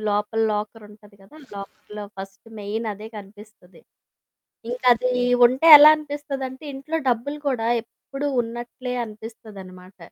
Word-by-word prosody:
లోపల 210 Hz, +2 st, -1 dB
లాకరుంటది 210 Hz, -1 st, -7 dB
కదా! 200 Hz, +11 st, -18 dB, 0.2 s
లాకర్‌లో 205 Hz, +1 st, -9 dB
ఫస్ట్ 195 Hz, +3 st, -10 dB
మెయినదే 210 Hz, +1 st, -5 dB
కనిపిస్తది. 205 Hz, -2 st, -14 dB, 0.9 s
ఇంకా 250 Hz, +1 st, -5 dB
అది 250 Hz, +2 st, -2 dB, 0.3 s
ఉంటే 260 Hz, +7 st, 0 dB
ఎలా 300 Hz, +1 st, +9 dB
అనిపిస్తదంటే, 280 Hz, -2 st, -6 dB
ఇంట్లో 275 Hz, +4 st, -4 dB
డబ్బులు 265 Hz, +5 st, -3 dB
కూడా 230 Hz, -3 st, -2 dB, 0.2 s
ఎప్పుడూ 275 Hz, +4 st, -7 dB
ఉన్నట్లే 240 Hz, +2 st, -7 dB
అనిపిస్తదనమాట. 200 Hz, -4 st, -12 dB
225 Hz, 105 wpm, -22 LUFS, 205-255 Hz, 0.9 s, ఎలా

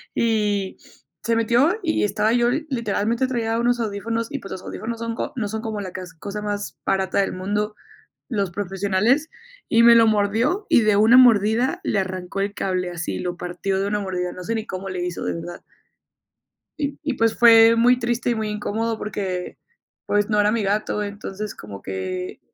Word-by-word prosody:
Y 210 Hz, -4 st, 0 dB, 0.5 s
se 230 Hz, -, +1 dB
metió 240 Hz, -, +2 dB
y 320 Hz, -8 st, +1 dB
estaba 210 Hz, +2 st, +1 dB
yo 240 Hz, 0 st, +3 dB, 0.2 s
literalmente 235 Hz, 0 st, 0 dB
traía 230 Hz, -2 st, -1 dB
unos 240 Hz, 0 st, +1 dB
audífonos 225 Hz, +1 st, -2 dB
y, 280 Hz, -, -3 dB
pues, 195 Hz, -, -10 dB
los 185 Hz, -, -6 dB
audífonos 230 Hz, +1 st, -5 dB
son 230 Hz, 0 st, -3 dB
co -, -, -4 dB
no 215 Hz, -, -1 dB
son 220 Hz, +1 st, -4 dB
como 220 Hz, -3 st, -4 dB
la 185 Hz, -, -6 dB
cas 185 Hz, -1 st, -8 dB
cosa 200 Hz, +5 st, -6 dB
más 205 Hz, -1 st, -4 dB
barata 190 Hz, 0 st, +1 dB
del 195 Hz, -, 0 dB
mundo, 210 Hz, +3 st, -2 dB, 0.6 s
los 200 Hz, -5 st, -1 dB
profesionales, 200 Hz, -, 0 dB, 0.4 s
y 230 Hz, -, +4 dB
me 235 Hz, -, +9 dB
lo 225 Hz, -1 st, +6 dB
mordió 220 Hz, -, +1 dB
y 235 Hz, -, +5 dB
de 215 Hz, -2 st, +3 dB
una 220 Hz, +4 st, +6 dB
mordida 240 Hz, -, +4 dB
le 210 Hz, -, 0 dB
arrancó 185 Hz, 0 st, -4 dB
el 200 Hz, +1 st, -2 dB
cable 185 Hz, -2 st, -2 dB
así 175 Hz, -1 st, -4 dB
lo 175 Hz, -1 st, -3 dB
partió 180 Hz, +2 st, -3 dB
de 200 Hz, -, -1 dB
una 210 Hz, 0 st, -1 dB
mordida, 180 Hz, -2 st, -3 dB
no 180 Hz, -, -8 dB
sé 230 Hz, -, -2 dB
ni 220 Hz, -, -4 dB
cómo 190 Hz, +1 st, -5 dB
le 180 Hz, -1 st, -3 dB
hizo, 175 Hz, -, -4 dB
de -, -, -1 dB
verdad. 175 Hz, +1 st, -7 dB, 1.2 s
Y 285 Hz, -1 st, -2 dB
y 290 Hz, -2 st, -1 dB
pues 230 Hz, -2 st, +1 dB
fue 230 Hz, -1 st, +7 dB
muy 245 Hz, +2 st, +4 dB
triste 240 Hz, 0 st, -1 dB
y -, -, 0 dB
muy 220 Hz, -1 st, -2 dB
incómodo 220 Hz, +2 st, -2 dB
porque, 190 Hz, -4 st, -4 dB, 0.5 s
pues 205 Hz, 0 st, +1 dB
no 210 Hz, -1 st, +2 dB
era 210 Hz, 0 st, +3 dB
mi 225 Hz, -1 st, 0 dB
gato, 210 Hz, +1 st, -1 dB
entonces 205 Hz, 0 st, -6 dB
como 100 Hz, -2 st, -10 dB
que. 95 Hz, -1 st, -5 dB
210 Hz, 190 wpm, -22 LUFS, 195-230 Hz, 1.2 s, me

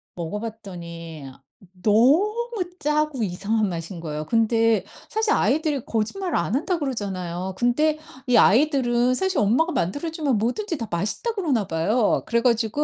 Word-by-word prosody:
먹어봤더니 170 Hz, -5 st, -7 dB, 0.6 s
너무 270 Hz, -, +4 dB, 0.5 s
짜고 300 Hz, -4 st, 0 dB
이상한 205 Hz, +3 st, 0 dB
맛인 170 Hz, +1 st, -6 dB
거예요. 155 Hz, -2 st, -4 dB
근데 225 Hz, +3 st, +2 dB, 0.3 s
사실 440 Hz, 0 st, +1 dB
아이들이 300 Hz, -4 st, +1 dB
거짓말을 340 Hz, -, -2 dB
안 170 Hz, +5 st, -1 dB
한다 340 Hz, +6 st, 0 dB
그러잖아요. 190 Hz, -, -3 dB
근데 300 Hz, +7 st, +2 dB, 0.3 s
이 250 Hz, -, +3 dB
아이들은 250 Hz, 0 st, +4 dB
사실 380 Hz, +7 st, 0 dB
엄마가 250 Hz, +12 st, +2 dB
만들어주면 285 Hz, -, -1 dB
뭐든지 330 Hz, -, -1 dB
다 230 Hz, -, -5 dB
맛있다 205 Hz, -, -1 dB
그러나 285 Hz, -, 0 dB
봐요. 200 Hz, +8 st, +1 dB
그래 235 Hz, 0 st, +2 dB
가지고 230 Hz, +3 st, +1 dB
230 Hz, 330 characters per minute, -23 LUFS, 195-300 Hz, 0.6 s, 너무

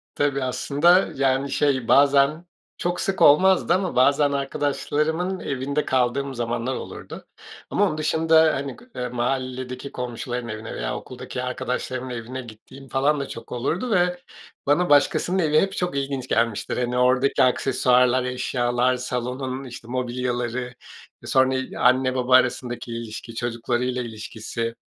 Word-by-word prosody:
Tabii 140 Hz, -2 st, 0 dB
aslında, 150 Hz, +8 st, +3 dB
yani, 135 Hz, 0 st, +1 dB
şey 130 Hz, -5 st, +1 dB
bazen, 140 Hz, +3 st, +4 dB, 0.3 s
çok 175 Hz, 0 st, -2 dB
sık 195 Hz, -1 st, -2 dB
olmazdı 180 Hz, +4 st, +5 dB
ama 185 Hz, -1 st, -1 dB
bazen 140 Hz, +3 st, +4 dB
arkadaşlarımın 150 Hz, +5 st, -1 dB
evinde 140 Hz, +2 st, -2 dB
kaldığım 130 Hz, +2 st, 0 dB
zamanlar 120 Hz, +2 st, -2 dB
olurdu -, -, -8 dB, 0.4 s
ama 205 Hz, -, +2 dB
onun 155 Hz, -, -3 dB
dışında, 160 Hz, 0 st, +3 dB
hani, 140 Hz, 0 st, -4 dB
gı 245 Hz, +1 st, -18 dB
eee, 125 Hz, 0 st, -3 dB
mahalledeki 130 Hz, +1 st, -3 dB
komşuların 120 Hz, 0 st, -4 dB
evine 110 Hz, 0 st, -6 dB
veya -, -, -3 dB
okuldaki -, -, -7 dB
arkadaşlarımın 130 Hz, 0 st, -3 dB
evine 125 Hz, +2 st, -5 dB
gittiğim 125 Hz, +4 st, -13 dB
falan 140 Hz, +3 st, +1 dB
da 140 Hz, -, -3 dB
çok 115 Hz, -, -9 dB
olurdu 165 Hz, -, -2 dB
ve 180 Hz, -2 st, +2 dB, 0.5 s
bana 175 Hz, +5 st, +3 dB
başkasının 145 Hz, +5 st, +3 dB
evi 155 Hz, -3 st, +3 dB
hep 195 Hz, -, 0 dB
çok 180 Hz, -5 st, -1 dB
ilginç 135 Hz, -2 st, -3 dB
gelmiştir. 115 Hz, -3 st, 0 dB
Hani, 125 Hz, 0 st, -1 dB
oradaki 130 Hz, +2 st, +3 dB
aksesuarlar, 125 Hz, 0 st, +3 dB
eşyalar, 125 Hz, 0 st, 0 dB
salonun, 125 Hz, +1 st, -4 dB
işte, 120 Hz, -3 st, -10 dB
mobilyaları, 125 Hz, 0 st, -2 dB, 0.5 s
sonra 130 Hz, 0 st, +3 dB
i 130 Hz, 0 st, -4 dB
anne 130 Hz, 0 st, +3 dB
baba 130 Hz, 0 st, +3 dB
arasındaki 125 Hz, -1 st, +1 dB
ilişki, 115 Hz, 0 st, -7 dB
çocuklarıyla 120 Hz, +2 st, -2 dB
ilişkisi. 115 Hz, 0 st, -5 dB
130 Hz, 135 wpm, -23 LUFS, 125-145 Hz, 0.5 s, olmazdı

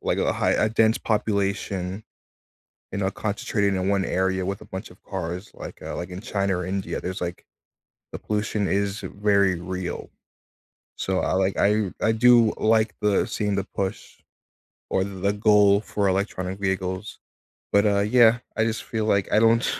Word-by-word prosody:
like, -, -, 0 dB
a -, -, +1 dB
high -, -, +1 dB
a 110 Hz, -, +2 dB
dense 110 Hz, 0 st, +3 dB
population, 100 Hz, -2 st, -1 dB, 0.9 s
you 100 Hz, -, -3 dB
know, 95 Hz, -1 st, 0 dB
concentrated 100 Hz, -1 st, -1 dB
in 95 Hz, 0 st, -1 dB
one 100 Hz, -1 st, +2 dB
area 95 Hz, +1 st, 0 dB
with 100 Hz, +1 st, -3 dB
a -, -, -11 dB
bunch 95 Hz, +3 st, -7 dB
of 90 Hz, -, -18 dB
cars, 90 Hz, +1 st, -5 dB
like, -, -, -9 dB
uh -, -, -5 dB
like, 90 Hz, +1 st, -5 dB
in 90 Hz, -, -6 dB
China 100 Hz, -5 st, -1 dB
or 90 Hz, -, -4 dB
India, 95 Hz, 0 st, -3 dB
there's, 90 Hz, +1 st, -5 dB
like 85 Hz, 0 st, -5 dB, 0.7 s
the -, -, -5 dB
pollution 105 Hz, -1 st, -1 dB
is 100 Hz, +1 st, 0 dB
very 100 Hz, -3 st, +1 dB
real. 90 Hz, 0 st, -5 dB, 0.9 s
So 95 Hz, -1 st, -1 dB
I, -, -, 0 dB
like 95 Hz, +1 st, +1 dB
I 105 Hz, -1 st, +2 dB
I 110 Hz, -, +4 dB
do 115 Hz, 0 st, +5 dB
like 110 Hz, 0 st, +2 dB
the 105 Hz, -2 st, +2 dB
seeing 105 Hz, -1 st, -1 dB
the 100 Hz, -, 0 dB
push. 95 Hz, +1 st, -4 dB, 0.7 s
Or, 95 Hz, -, +2 dB
the 100 Hz, +1 st, -2 dB
goal 105 Hz, -1 st, +4 dB
for 100 Hz, -2 st, -1 dB
electronic 95 Hz, -1 st, -1 dB
vehicles. 95 Hz, 0 st, -3 dB, 0.5 s
But, 100 Hz, +1 st, +4 dB
uh, 100 Hz, -1 st, +2 dB
yeah, 115 Hz, +2 st, +5 dB, 0.2 s
I 110 Hz, -, +2 dB
just 110 Hz, -1 st, -2 dB
feel 110 Hz, -2 st, -2 dB
like 100 Hz, -3 st, +2 dB
I 105 Hz, -, +6 dB
don't 115 Hz, +1 st, +4 dB
100 Hz, 175 wpm, -24 LUFS, 95-105 Hz, 0.9 s, I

